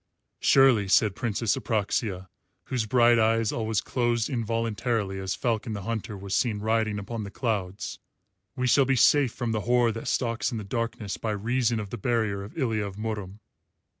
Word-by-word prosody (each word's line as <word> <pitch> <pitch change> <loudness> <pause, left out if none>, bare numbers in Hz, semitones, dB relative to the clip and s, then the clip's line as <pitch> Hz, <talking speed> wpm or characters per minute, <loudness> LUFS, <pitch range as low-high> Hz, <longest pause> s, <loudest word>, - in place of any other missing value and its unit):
"Surely," 130 -7 +5
said 105 +1 +4
Princess 115 -1 0
Apraxia, 105 -5 -1 0.4
whose 120 -4 -2
bright 120 0 +5
eyes 115 0 +2
always 110 -2 -1
closed 120 -2 0
involuntarily 115 -3 -1
as 95 0 -2
Falcon 115 -2 -1
the 100 -2 -5
Hunter 110 -1 -4
was 100 0 -6
seen 115 -4 +1
riding 110 0 0
upon 105 +2 -5
the 100 - -6
clouds, 100 -4 -3 0.6
"we 125 -2 -1
shall 135 +2 +4
be 135 +1 +2
safe 130 +1 +4
from 120 -1 -3
the 110 -1 -1
horror 120 +1 +3
that 115 +1 -6
stalks 115 -1 0
in 115 - -3
the 105 - -5
darkness 110 -1 -3
by 115 - -3
reason 115 +2 0
of 105 -2 -6
the 120 - -5
barrier 110 -3 0
of 105 +10 -11
Ilya 115 -7 0
of 100 -2 -6
Murom." 105 -2 -5
110 Hz, 175 wpm, -27 LUFS, 105-120 Hz, 0.6 s, Surely